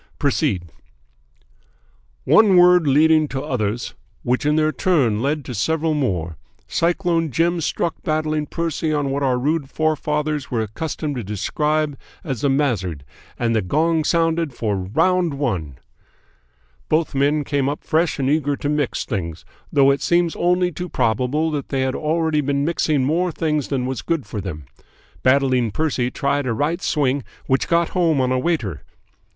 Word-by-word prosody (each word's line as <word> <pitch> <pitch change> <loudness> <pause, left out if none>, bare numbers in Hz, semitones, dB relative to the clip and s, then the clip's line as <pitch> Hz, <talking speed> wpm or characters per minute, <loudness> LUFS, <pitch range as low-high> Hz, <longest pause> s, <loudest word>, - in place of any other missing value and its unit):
Proceed!" 140 - 0 1.6
"One 205 - +5
word 180 -2 +6
leading 155 +2 +4
to 135 -1 -4
others, 120 -5 -2 0.3
which 125 +4 0
in 150 - +3
their 155 0 +2
turn 135 - +1
led 145 +2 -1
to 125 - -6
several 160 +8 0
more, 90 - -2 0.3
Cyclone 170 -1 0
Jim 170 +5 +1
struck 165 +2 -2
Battling 155 -1 -1
Percy 165 -1 -2
on 145 -2 0
what 140 +1 -1
our 130 -2 +2
rude 145 +2 -1
forefathers 150 -2 -1
were 115 -3 0
accustomed 145 +5 -4
to 120 - -3
describe 150 +9 -1 0.2
as 135 -7 -4
the 140 - +2
mazzard, 100 - -1 0.3
and 115 -1 0
the 110 - +2
gong 160 - +1
sounded 165 -3 +1
for 105 -3 -1
"ROUND 160 - +1
ONE 95 - -2 1.1
"Both 155 0 +1
men 145 +2 +2
came 140 -1 0
up 145 - -5
fresh 160 +1 +1
and 135 -2 -1
eager 145 0 +1
to 145 - -3
mix 150 -3 -1
things, 85 -7 -4 0.3
though 140 -1 +5
it 140 - -1
seems 170 -1 +2
only 180 +1 +1
too 180 +1 -6
probable 130 +9 0
that 145 -2 -4
they 135 -1 -1
had 130 0 0
already 160 0 0
been 140 0 0
mixing 155 -4 +1
more 170 +5 +1
things 150 -3 -1
than 130 -3 -1
was 130 -1 -3
good 165 -5 -2
for 105 - -5
them. 80 -7 -6 0.6
Battling 130 -3 +3
Percy 130 -1 -1
tried 140 0 -1
a 120 - 0
right 155 +9 -1
swing 140 -3 0 0.2
which 130 0 +1
got 170 0 +2
home 165 -5 +1
on 130 -1 +1
a 130 - +1
waiter. 120 - -1
145 Hz, 160 wpm, -21 LUFS, 130-160 Hz, 1.6 s, word